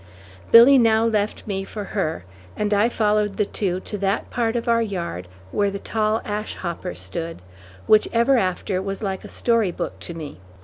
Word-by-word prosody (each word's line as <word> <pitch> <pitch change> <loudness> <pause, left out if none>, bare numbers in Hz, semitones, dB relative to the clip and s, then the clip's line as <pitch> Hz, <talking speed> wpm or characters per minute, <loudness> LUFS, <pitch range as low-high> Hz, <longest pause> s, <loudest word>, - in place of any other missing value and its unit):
Billy 250 +4 +9
now 225 -1 +4
left 215 -2 -1
me 195 -2 -3
for 205 +1 -6
her, 175 - -3 0.3
and 210 0 0
I 205 +3 +3
followed 210 -3 +1
the 210 - +2
two 185 -3 -2
to 210 - -6
that 195 +1 -1
part 230 -1 0
of 235 - -2
our 230 0 +3
yard 170 - -4 0.2
where 205 -1 +1
the 200 - -4
tall 215 +2 -1
ash 210 +1 -4
hopper 170 - -5
stood, 100 - -6 0.5
which 215 0 +5
ever 235 +4 +3
after 185 0 -1
was 195 +2 -5
like 190 -2 -3
a - - -9
story 230 -5 +1
book - - -5
to 170 - -7
me. 150 - -8
205 Hz, 185 wpm, -22 LUFS, 190-225 Hz, 0.5 s, Billy